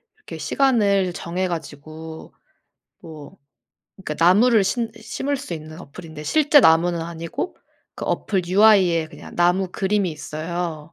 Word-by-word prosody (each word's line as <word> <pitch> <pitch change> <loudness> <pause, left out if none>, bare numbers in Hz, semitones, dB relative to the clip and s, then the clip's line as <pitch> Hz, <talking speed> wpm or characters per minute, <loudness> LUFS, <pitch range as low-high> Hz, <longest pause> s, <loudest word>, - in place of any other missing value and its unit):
이렇게 430 - -10
시간을 200 -9 +1
정해 180 +2 -3
가지고 160 0 -8 0.7
뭐 155 +2 -12 0.6
그러니까 165 -4 -2
나무를 215 +4 +5
신 230 +3 -1
심을 280 +5 -3
수 265 -10 -6
있는 155 +2 -10
어플인데 155 0 -10
실제 295 - +4
나무는 170 -1 +4
아니고 165 - -5 0.4
그 - - -6
어플 190 -3 -1
UI에 185 -4 +4
그냥 - - -12
나무 180 +2 +2
그림이 195 -2 0
있어요. 155 +1 -5
175 Hz, 290 characters per minute, -22 LUFS, 160-205 Hz, 0.7 s, 나무를